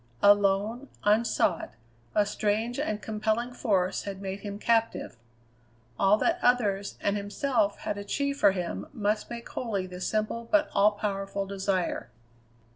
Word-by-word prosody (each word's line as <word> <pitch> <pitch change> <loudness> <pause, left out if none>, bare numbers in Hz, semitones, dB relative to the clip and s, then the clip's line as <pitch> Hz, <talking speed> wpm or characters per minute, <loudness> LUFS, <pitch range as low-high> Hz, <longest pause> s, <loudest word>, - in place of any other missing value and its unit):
Alone, 205 +5 +3
unsought, 205 - +2 0.4
a 210 - +4
strange 215 +4 -1
and 215 -8 -2
compelling 220 +3 -1
force 195 -7 +1
had 195 -1 -6
made 195 0 -4
him 200 0 -6
captive. 225 - +1 0.8
All 195 +2 +5
that 340 +9 +1
others, 205 -5 +1
and 200 - +1
himself, 205 +1 0
had 205 - -3
achieved 280 +7 -2
for 200 - +6
him 180 -3 -4
must 210 -3 -1
make 235 0 -6
holy 205 -6 -2
this 180 0 -5
simple 220 +2 -2
but 310 -1 +3
all 205 +1 +5
powerful 200 -1 -3
desire. 190 -6 -1
205 Hz, 135 wpm, -28 LUFS, 200-230 Hz, 0.8 s, for